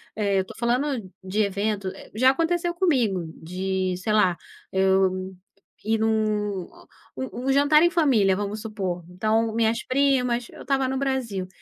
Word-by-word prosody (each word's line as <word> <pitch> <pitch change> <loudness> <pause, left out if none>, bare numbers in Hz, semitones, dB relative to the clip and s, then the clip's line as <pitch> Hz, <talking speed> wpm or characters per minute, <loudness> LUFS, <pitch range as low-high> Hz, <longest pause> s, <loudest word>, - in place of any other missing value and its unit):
Eh, 200 -2 +1
eu - - +3
estou - - -12
falando 240 -3 -1
de 190 +3 -1
evento 200 -1 -1 0.2
já 255 +5 +4
aconteceu 340 +4 0
comigo, 260 - +1
de 185 +2 -2
sei 200 +4 -2
lá, 185 -5 +3 0.3
eu 190 0 +1 0.5
ir 220 +1 +1
num 215 -3 0 0.5
u 260 0 -5
um - - +5
jantar 285 +3 +5
em 345 - +5
família, 255 - +3
vamos 205 +2 -4
supor, 190 -6 -4
então 220 +5 0
minhas 230 0 +1
primas, 255 -3 +1
eu - - -12
estava 270 0 0
no 265 - -2
Brasil 255 -9 -2
215 Hz, 150 wpm, -24 LUFS, 190-260 Hz, 0.5 s, um